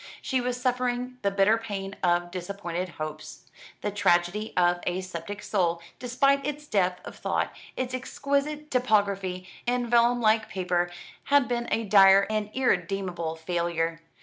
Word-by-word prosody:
She 260 -2 -1
was 250 0 -2
suffering 250 0 -1
the 200 - +2
bitter 200 +3 +3
pain 200 -3 -5
of 175 -1 +1
disappointed 180 -1 -4
hopes. 155 0 -7 0.4
"The 210 - -2
Tragedy 200 +1 +1
of 175 0 +3
a 180 +1 0
Sceptic 185 +2 -7
Soul," 175 -4 +1 0.2
despite 275 +3 +2
its 295 +1 -4
depth 185 -7 0
of - - -8
thought, - - -1 0.2
its 255 0 -2
exquisite 280 +3 -2
typography 200 -6 +1 0.2
and 245 0 +1
vellum 240 +1 +4
like 220 -1 +2
paper, 180 -2 0 0.4
had 285 -2 +4
been 240 -1 -2
a 230 - 0
dire 195 -1 +7
and 215 -1 -1
irredeemable 180 -8 0
failure. 165 0 -2
200 Hz, 145 wpm, -27 LUFS, 180-245 Hz, 0.4 s, dire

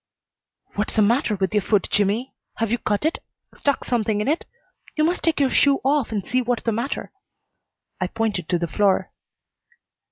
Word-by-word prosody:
"What's 210 +1 -2
the 215 - +5
matter 230 0 +2
with 190 -1 -1
your 210 - +3
foot, 205 -1 +1
Jimmy? 210 +6 +1 0.2
Have 225 -2 -1
you 240 - +1
cut 210 +6 -1
it, 320 - 0 0.4
stuck 285 -1 0
something 220 -3 0
in 210 - -1
it? 310 +4 0 0.5
You 305 - +2
must 345 +3 +1
take 330 -3 +1
your 275 -2 +3
shoe 280 -1 +4
off 280 -3 +2
and 205 -4 -2
see 255 +1 +1
what's 245 -1 -1
the 230 - +1
matter." 235 +6 -3 0.9
I 185 - 0
pointed 210 -5 -2
to 175 - +2
the 170 - -1
floor. 195 +2 +1
225 Hz, 185 wpm, -23 LUFS, 205-270 Hz, 0.9 s, the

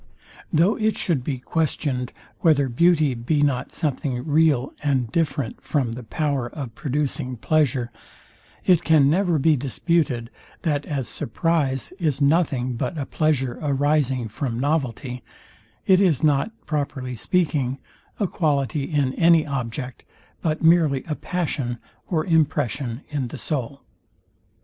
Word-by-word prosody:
Though 170 +6 +3
it 220 -1 +1
should 155 -8 0
be 135 0 -2
questioned, 130 -3 -1 0.3
whether 145 -5 +3
beauty 155 +1 +3
be 135 +5 0
not 135 -4 0
something 135 -5 -2
real, 150 -4 +2
and 130 -6 0
different 145 -7 -1
from 135 -6 -1
the 120 +2 -6
power 135 +1 -2
of 135 -6 -7
producing 140 -1 -2
pleasure, 130 -3 +1 0.7
it 175 -3 +4
can 150 -4 +5
never 180 -1 +2
be 155 +2 +4
disputed, 135 -2 0 0.3
that 150 -4 0
as 140 -5 -2
surprize 145 -1 -1
is 150 -6 0
nothing 140 -4 +2
but 140 +8 -3
a 140 - -2
pleasure 135 -6 0
arising 140 -4 +1
from 115 +2 -3
novelty, 130 -3 -1 0.6
it 190 0 +5
is 165 -7 +2
not, 145 +4 +3 0.2
properly 140 -4 -3
speaking, 135 - 0 0.4
a 205 - +2
quality 145 - 0
in 140 -4 0
any 165 0 +4
object, 125 -2 -4 0.4
but 155 0 -1
merely 160 -5 +4
a 155 - -1
passion 145 -8 -2 0.3
or 160 -3 0
impression 145 - 0
in 140 -4 -1
the - - -8
soul. 140 -2 -4
145 Hz, 130 wpm, -23 LUFS, 130-160 Hz, 0.7 s, can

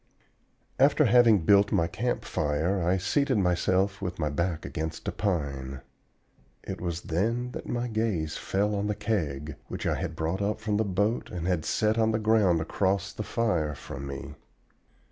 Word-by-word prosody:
After - - +5
having 115 -8 +5
built 100 +1 +5
my 85 - +3
camp 120 +7 -2
fire 80 +6 0
I 90 +3 +2
seated 130 +7 +1
myself 95 +1 +1
with 90 -2 -3
my 75 -3 -1
back 85 +2 -1
against 80 0 -5
a - - +1
pine; 70 -9 -2 0.8
it - - -6
was 85 -1 -3
then 115 +9 -1
that - - -7
my 120 0 -1
gaze 110 -9 -1
again - - -6
fell 100 +2 0
on 100 0 -1
the 105 - -1
Keg, 80 - -2
which - - -5
I - - +2
had 80 - -3
brought 80 +5 -2
up 105 +2 -1
from 105 -1 -1
the 110 - +2
boat 105 +4 0
and 85 -2 -5
had 90 -3 0
set 110 +1 +1
on 110 0 +3
the - - +2
ground 105 -6 +3
across 95 +4 0
the - - -5
fire 90 -10 0
from 70 0 -7
me. 70 0 -6
95 Hz, 180 wpm, -28 LUFS, 80-110 Hz, 0.8 s, After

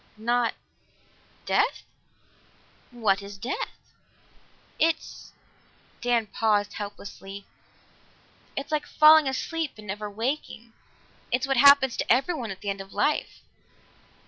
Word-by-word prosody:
"Not 235 +2 0 0.9
death?" - - +1 1.1
"What 215 -5 +1
is 200 0 -9
death?" 265 - -6 0.9
"It's 325 0 -1 0.4
" - - -33
Dan 240 -2 +1
paused 205 -1 0
helplessly. 200 -1 -8 1.1
"It's 275 +3 -4
like 305 -1 -1
falling 310 -1 +7
asleep 315 +3 -3
and 215 - -12
never 210 +1 -5
waking. 230 0 -4 0.6
It's 255 +1 +1
what 270 -1 0
happens 280 -1 +7
to - - 0
everyone 255 -1 +1
at 190 -1 -7
the 205 - -2
end 195 0 -6
of 195 0 -12
life." 300 - -1
235 Hz, 115 wpm, -26 LUFS, 205-280 Hz, 1.1 s, falling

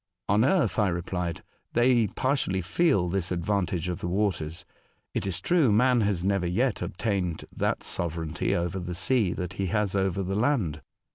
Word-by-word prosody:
'' - - -61
On 105 +3 +3
earth," 150 -1 +2
I 105 - +3
replied, 85 -1 -3
" - - -44
they 120 -2 +4
partially 125 -6 -1
feel 100 - +2
this 95 0 -2
advantage 90 -1 -1
of 90 0 -3
the 85 - -3
waters. 90 -3 -1 0.5
It - - -1
is 90 -2 0
true, 160 - +3
man 125 +3 +4
has 100 -4 0
never 100 -2 +1
yet 115 +7 0
obtained 90 -2 -2
that - - -1
sovereignty 80 -1 -2
over 85 +2 -1
the 90 -1 -5
sea 95 +1 +2
that 90 -1 -4
he 95 0 -2
has 105 0 0
over 95 0 0
the 95 +1 -3
land. 105 - 0
95 Hz, 180 wpm, -27 LUFS, 90-110 Hz, 0.5 s, they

